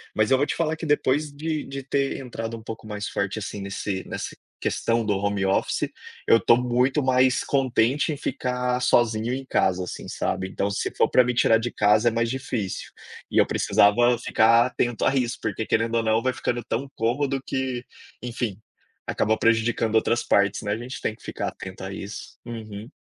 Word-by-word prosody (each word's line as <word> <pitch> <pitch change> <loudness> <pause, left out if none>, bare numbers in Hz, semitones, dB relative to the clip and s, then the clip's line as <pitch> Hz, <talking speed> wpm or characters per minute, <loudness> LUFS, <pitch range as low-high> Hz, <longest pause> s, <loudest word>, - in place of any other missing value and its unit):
mas 110 +3 +2
eu 130 - +6
vou 145 - +2
te - - -2
falar 160 -1 0
que 160 - -6
depois 150 0 +1
de 155 +1 -3
de 135 0 -7
ter 140 +1 -1
entrado 115 -3 -5
um 110 - -12
pouco 110 -1 -8
mais 105 -1 -4
forte, 100 +1 -2
assim, 100 0 -5
nesse 100 0 -3
nessa - - -5 0.2
questão 115 0 0
do 105 - +1
home 100 -1 0
office, 95 - 0 0.4
eu 115 - +6
estou 115 - +5
muito 125 +3 +1
mais 130 0 +3
contente 135 +2 +1
em 145 - -6
ficar 125 -1 -1
sozinho 120 -1 +2
em 135 0 -4
casa, 95 -6 +1
assim, 90 - -7
sabe. 95 - -2
Então 100 +1 -2
se 100 - -1
for - - +3
para 125 - +5
me 125 - 0
tirar 115 -1 +4
de 120 +1 -3
casa 105 +2 +3
é - - +5
mais 115 +1 0
difícil. 120 -6 -3 0.4
E - - -2
eu - - +6
precisava 120 +4 +3
ficar 115 0 +4
atento 120 -2 -1
a - - +3
isso 125 -1 0
porque 110 +1 -2
querendo 115 +1 +1
ou 115 - +2
não 110 +1 +2
vai 130 - +1
ficando 120 -1 -2
tão 125 +6 -3
cômodo 135 +4 0
que, 130 -2 -2 0.4
enfim, 120 -4 -3 0.5
acaba 110 +1 +1
prejudicando 115 0 +2
outras 115 +1 +2
partes, 100 -1 +2
né, 105 - -2
a 105 - 0
gente 125 +3 -7
tem - - -1
que - - -25
ficar - - -3
atento 95 0 -9
a 95 - -5
isso. 100 +1 -8
Uhum. 110 -2 -7
115 Hz, 200 wpm, -24 LUFS, 110-130 Hz, 0.5 s, eu